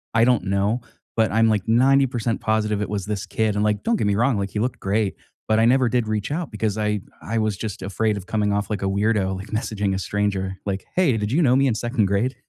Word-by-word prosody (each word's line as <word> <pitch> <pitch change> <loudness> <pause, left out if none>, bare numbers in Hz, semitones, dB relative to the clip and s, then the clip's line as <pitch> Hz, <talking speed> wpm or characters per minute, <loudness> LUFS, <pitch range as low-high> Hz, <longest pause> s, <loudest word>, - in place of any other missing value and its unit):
I 115 - +5
don't 125 -4 +2
know, 100 +5 0 0.3
but 110 -1 +2
I'm, 115 +1 +4
like, 105 -2 0
90% 120 -1 +2
positive 105 -1 0
it - - -3
was 100 -2 -3
this 105 -1 -3
kid, 105 +1 0
and, 105 - +1
like, 105 -1 0
don't 235 - +2
get 105 - 0
me 100 - +2
wrong, 120 +1 +2
like, 100 0 -2
he 105 - -3
looked 125 +3 -2
great, 100 0 0 0.3
but 110 0 +3
I 115 - +4
never 130 +1 +4
did 120 -2 0
reach 110 +4 -2
out 165 0 -3
because 105 -1 -2
I 105 -1 0 0.2
I 115 +1 -3
was 110 -2 0
just 105 -4 -5
afraid 105 +2 -1
of 95 - -7
coming 105 -2 0
off 100 0 -1
like 105 -3 -2
a - - -1
weirdo, 100 -1 +1
like, 95 - -8
messaging 105 -2 -1
a 95 - -2
stranger. 95 -2 -2
Like, 100 -1 -2
"Hey, 175 -10 +3
did 105 +1 -2
you 160 - +3
know 130 -5 +4
me 135 +1 +3
in 120 - +1
2nd 120 -1 0
grade?" 100 +7 0
105 Hz, 255 wpm, -23 LUFS, 100-115 Hz, 0.3 s, I